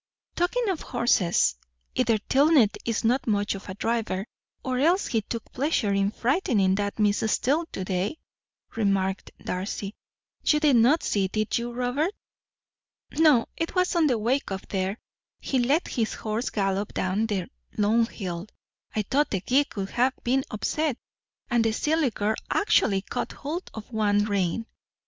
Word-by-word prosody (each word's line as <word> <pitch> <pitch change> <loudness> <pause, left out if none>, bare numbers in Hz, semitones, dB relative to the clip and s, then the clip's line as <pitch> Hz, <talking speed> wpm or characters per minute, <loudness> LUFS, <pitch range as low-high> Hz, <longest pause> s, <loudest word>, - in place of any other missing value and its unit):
"Talking 440 +8 0
of 365 -5 -1
horses, 185 - +2 0.4
either 225 - +2
Tilney 270 +1 +4 0.2
is 230 -2 -1
not 245 +4 +1
much 205 -1 +1
of 195 0 -9
a 185 - -5
driver, 215 -3 -1 0.4
or 255 -1 -1
else 345 +7 +3
he 225 -3 0
took 230 +2 -6
pleasure 255 -7 0
in 195 0 +2
frightening 225 - +1
that 200 +1 -1
Miss 205 -2 +2
Steele 310 +6 +1
to 190 - -5
day," 190 +10 -1 0.6
remarked 195 -3 0 0.2
Darcy. 195 +2 -3 0.5
"You 300 - +3
did 295 -5 +4
not 255 +8 +4
see, 195 -2 +1
did 215 +2 -1
you, 240 +1 -4
Robert? 250 - -1 1.0
No, 300 -7 +4
it 330 +3 -3
was 365 0 +2
on 330 -3 +4
the 250 -4 +2
way 245 +6 +1
up 190 -1 -5
there. 190 +1 -1 0.4
He 265 - -1
let 275 +8 +2
his 225 -3 -1
horse 220 +3 -2
gallop 195 0 -1
down 195 +4 0
the 200 -4 -1 0.3
long 220 +2 +3
hill 180 -4 -5 0.5
I 215 - +1
thought 280 +8 +1
the 195 - -1
gig 275 +8 +1
would 195 -1 -3
have 255 +2 +2
been 260 +2 +2
upset 285 +5 -1 0.5
and 240 -1 +3
the 225 -1 +1
silly 305 +3 +1
girl 210 0 -1
actually 205 - +2
caught - - -4
hold 320 +6 -5
of 220 +2 -9
one 205 -1 +2
rein." 200 +1 0
225 Hz, 160 wpm, -26 LUFS, 200-275 Hz, 1.0 s, Tilney